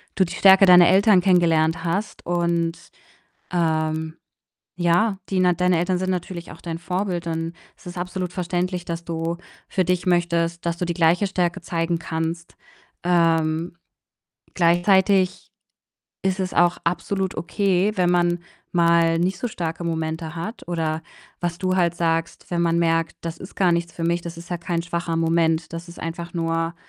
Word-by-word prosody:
du 190 - +3
die 170 - -7
Stärke 195 0 +7
deiner 180 -1 +8
Eltern 195 -1 +5
kennengelernt 165 -3 +2
hast? 195 +6 -3
Und, 170 -1 0 0.8
ähm, 160 -2 0 0.6
ja, 180 +4 +2
die 190 -1 0
na 180 -1 +4
deine 180 0 +2
Eltern 180 +2 0
sind 185 0 -2
natürlich 180 -1 -4
auch - - -13
dein 165 -1 -5
Vorbild 180 -1 -2
und 165 +1 -3 0.2
es - - -21
ist 175 0 -8
absolut 180 0 -4
verständlich, 180 0 -2
dass 170 0 -5
du 165 0 -3 0.3
für 185 -2 +1
dich 180 +1 0
möchtest, 170 -1 +1
dass 170 0 -1
du 180 - -2
die 170 -1 -2
gleiche 175 +4 +3
Stärke 180 -1 -1
zeigen 165 0 -1
kannst. 165 +1 -4 0.5
Ähm, 165 -1 +1 0.8
gleichzeitig 185 +2 +3 0.7
ist 190 0 0
es 185 - -3
auch 175 0 +3
absolut 185 +3 -1
okay, 195 +4 +1
wenn 180 -1 +2
man 175 0 +2 0.3
mal 170 -1 +4
nicht 180 +2 0
so 245 - -2
starke 170 -5 -4
Momente 160 0 -3
hat 170 +7 -6
oder 160 -2 -2 0.4
was 175 -1 -2
du 185 -1 0
halt 170 -1 +2
sagst, 165 -1 -1
wenn 170 - 0
man 170 0 +2
merkt: 165 -1 +1
„Das 165 -1 -5
ist 185 - -11
gar 180 -3 +3
nichts 170 0 -1
für 165 - -5
mich.“ 170 +1 +1
Das 170 -1 -8
ist 170 +1 -11
ja 175 - -2
kein 170 0 -2
schwacher 170 -1 -3
Moment. 165 0 +1
Das 165 +1 -6
ist 170 - -12
einfach 170 +1 -6
nur, 165 0 -1
170 Hz, 165 wpm, -23 LUFS, 165-180 Hz, 0.8 s, deiner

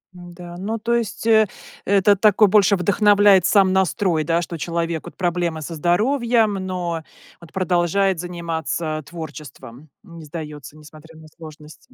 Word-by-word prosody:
Да, 175 0 -11
ну, 215 +5 -4
то 235 +2 0
есть, 230 -1 -3
э 220 -1 +5 0.4
это 200 +1 +4
такой 210 +1 +4
больше 200 0 +4
вдохновляет 200 0 +4
сам 195 -3 +3
настрой, 185 -3 +1
да, 165 +2 0
что 170 0 -6
человек 170 0 -3
вот - - -11
проблемы 175 -3 -2
со 165 +3 -6
здоровьем, 225 - +1
но 180 -3 -4 0.4
вот 170 - -16
продолжает 185 0 0
заниматься 165 -2 -4
творчеством. 150 -5 -10
Не 170 -5 -12
сдается, 150 -2 -9
несмотря 155 +1 -15
на 155 - -14
сложности. 155 +7 -14
175 Hz, 140 wpm, -21 LUFS, 160-200 Hz, 0.4 s, э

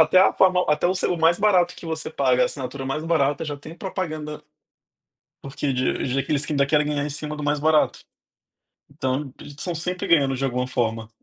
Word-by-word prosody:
até 160 +3 +6
a 190 - +5
forma 185 -1 +3
até 150 +2 +2
o 185 - +1
selo 180 -1 0
o 165 - -6
mais 165 +1 +4
barato 185 -4 +3
que - - -10
você 160 -1 -4
paga, 130 -5 +2
a - - +5
assinatura 135 0 -6
mais 150 +4 -3
barata 145 -3 +1
já 145 -2 -4
tem 155 +3 -11
propaganda 155 -5 -5 1.0
porque 135 +1 -3
de 130 0 0
de 130 +1 0
aqueles 145 +1 -1
que 155 - -3
ainda 140 -1 +3
querem 150 +1 +2
ganhar 145 -1 -1
em 150 - -3
cima 150 +1 -4
do 150 - -6
mais 145 0 0
barato. 155 0 +2 0.9
Então, 135 -1 -3
eles 145 -1 -11
são 175 0 -3
sempre 180 +3 -3
ganhando 140 -5 +3
de 135 - -3
alguma 125 -1 -1
forma. 115 -3 -2
150 Hz, 215 wpm, -23 LUFS, 135-165 Hz, 1.0 s, até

